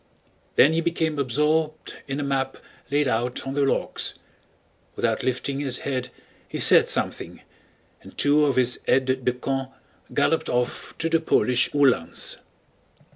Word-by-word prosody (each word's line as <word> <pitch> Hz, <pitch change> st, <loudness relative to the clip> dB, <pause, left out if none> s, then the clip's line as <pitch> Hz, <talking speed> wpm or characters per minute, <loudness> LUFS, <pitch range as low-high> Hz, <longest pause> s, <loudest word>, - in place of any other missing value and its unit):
Then 145 Hz, +4 st, +6 dB
he 165 Hz, -, +1 dB
became 160 Hz, -3 st, -1 dB
absorbed 150 Hz, +4 st, -1 dB
in 140 Hz, +1 st, -3 dB
a -, -, -2 dB
map 135 Hz, -1 st, -2 dB, 0.3 s
laid 145 Hz, 0 st, +1 dB
out 120 Hz, +1 st, -2 dB
on 135 Hz, -, -4 dB
the 145 Hz, -, 0 dB
logs. 135 Hz, -, 0 dB, 0.8 s
Without -, -, 0 dB
lifting 130 Hz, +2 st, -2 dB
his 135 Hz, -3 st, +1 dB
head 130 Hz, -2 st, -2 dB, 0.4 s
he -, -, -6 dB
said -, -, +6 dB
something, -, -, -3 dB, 0.6 s
and -, -, -15 dB
two 150 Hz, +1 st, +4 dB
of 140 Hz, -, +1 dB
his 125 Hz, -1 st, +2 dB
aides 130 Hz, 0 st, +2 dB
de 125 Hz, -, +2 dB
camp 135 Hz, +1 st, -3 dB, 0.4 s
galloped -, -, +1 dB
off 125 Hz, 0 st, -2 dB
to 165 Hz, -, -1 dB
the 165 Hz, 0 st, +2 dB
Polish 125 Hz, -5 st, +2 dB
Uhlans. 130 Hz, -, +2 dB
135 Hz, 145 wpm, -24 LUFS, 130-150 Hz, 0.8 s, Then